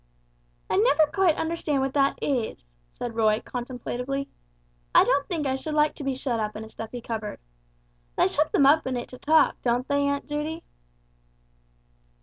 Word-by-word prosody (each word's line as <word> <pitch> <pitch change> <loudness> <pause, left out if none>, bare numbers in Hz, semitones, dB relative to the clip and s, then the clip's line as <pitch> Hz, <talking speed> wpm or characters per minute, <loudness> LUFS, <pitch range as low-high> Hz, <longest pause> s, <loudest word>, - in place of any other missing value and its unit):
"I - - 0
never 405 -7 +5
quite 375 -5 +3
understand 320 -4 -1
what 270 0 -2
that 275 -1 +2
is," 240 - -2 0.3
said 240 - -5
Roy, 215 -1 +2
contemplatively. 250 +2 -4 0.7
"I - - +9
don't 280 0 +1
think 325 -5 -2
I 265 - +1
should 300 +3 -4
like 300 0 +3
to 290 - -8
be 270 -1 -1
shut 255 -3 -2
up 215 -1 -2
in 215 - -6
a 220 - -10
stuffy 225 +2 -7
cupboard. 220 -2 -5 0.8
They - - +4
shut 300 +9 0
them 280 - +4
up 295 +1 +5
in 255 -1 -1
it 240 - -5
to 255 - -11
talk, 315 +2 +3
don't 245 +1 0
they, 285 0 +1
Aunt 280 0 -1
Judy?" 305 +3 -3
275 Hz, 175 wpm, -26 LUFS, 240-300 Hz, 0.8 s, I